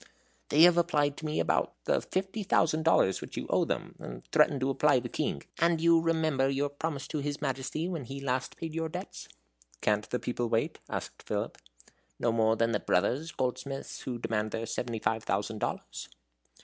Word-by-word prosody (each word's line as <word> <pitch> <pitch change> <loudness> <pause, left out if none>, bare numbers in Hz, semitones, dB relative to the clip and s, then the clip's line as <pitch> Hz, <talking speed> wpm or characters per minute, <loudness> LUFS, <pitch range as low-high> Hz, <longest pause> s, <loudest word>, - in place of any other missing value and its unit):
"They 155 +3 +6
have 175 0 +8
applied 145 -4 +2
to 155 - -4
me 155 - -1
about - - +1
the - - +2
fifty 190 +3 -2
thousand 160 -5 +2
dollars 155 -11 +3
which - - -8
you - - -2
owe - - +3
them, - - -3
and - - -8
threaten 140 - +4
to 135 +1 +1
apply 150 +2 +4
to 125 - -1
the - - -4
King. 70 - -2 0.2
And 170 0 +3
you 165 0 +5
remember 160 -5 +2
your 140 +1 0
promise 145 -1 -4
to 155 - -2
his 145 0 -3
Majesty, 135 +5 -2
when 165 -7 -4 0.2
last 130 -1 -1
he 165 - -3
paid 160 - -9
your 165 0 -2
debts." - - -7 0.5
"Can't 105 - +1
the 125 - 0
people 120 -1 -2
wait?" 115 0 0
asked - - -5
Philip. - - -3 0.6
"No 120 - +1
more 110 -1 +3
than 115 +1 +2
the 105 - +1
Brothers, 130 - +1
goldsmiths, 135 +2 -3
who 125 -2 -4
demand 110 -2 -1
their 115 +1 -3
seventy 120 0 -3
five 110 0 0
thousand 105 +2 -1
dollars." - - -4
135 Hz, 195 wpm, -30 LUFS, 115-160 Hz, 0.6 s, have